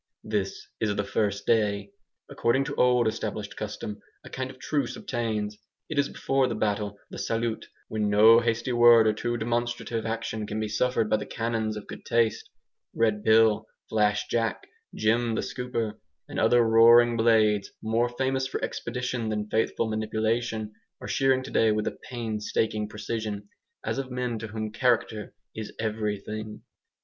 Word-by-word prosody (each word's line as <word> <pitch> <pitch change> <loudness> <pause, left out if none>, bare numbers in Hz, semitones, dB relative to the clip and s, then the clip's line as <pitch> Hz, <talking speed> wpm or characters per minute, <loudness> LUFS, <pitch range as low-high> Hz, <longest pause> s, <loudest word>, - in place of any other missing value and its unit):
This 105 -3 -3
is 105 -2 0
the 100 - 0
first 100 0 -1
day. 100 -3 +1 0.4
According 125 +4 +1
to - - -4
old 125 -2 +4
established 110 -2 -3
custom, 105 -1 -6 0.2
a - - -12
kind 130 0 -3
of 130 - -11
truce 140 -1 -2
obtains. 110 -4 -3 0.3
It 155 -3 0
is 140 - +2
before 135 -1 +1
the 115 - -2
battle, 105 -1 -1
the - - -7
"salut," 115 0 -2 0.2
when 105 -1 -1
no 110 +3 +7
hasty 115 +1 -1
word 120 -1 +7
or 110 - +3
too 120 +2 -2
demonstrative 120 0 -2
action 110 -1 -3
can 105 +1 -3
be 110 - -1
suffered 115 +1 +1
by 110 - +2
the 105 - -6
canons 115 -2 -2
of 105 - -8
good - - -9
taste. 115 -2 +1 0.5
Red 110 -2 +2
Bill, 110 -1 +4 0.2
Flash 105 -1 +2
Jack, 115 -1 -1 0.3
Jem 115 +1 +1
the - - 0
Scooper, 115 -4 -3 0.3
and - - -4
other 120 -1 +5
roaring 115 +1 +6
blades, 110 -3 +3
more 115 +2 +1
famous 130 +2 -1
for - - -3
expedition 125 -2 -3
than 105 -1 -3
faithful 110 +1 +1
manipulation, 110 0 -1 0.3
are - - -8
shearing 130 -1 +2
today 115 -4 +2
with 105 0 0
a - - -4
painstaking 110 -2 -2
precision, 105 -1 -4 0.4
as - - -1
of 135 -1 -4
men 125 -2 -2
to 110 - -5
whom 110 0 -4
character 110 -3 0 0.2
is 110 -1 -5
everything. 105 -1 -4
110 Hz, 160 wpm, -27 LUFS, 105-120 Hz, 0.5 s, no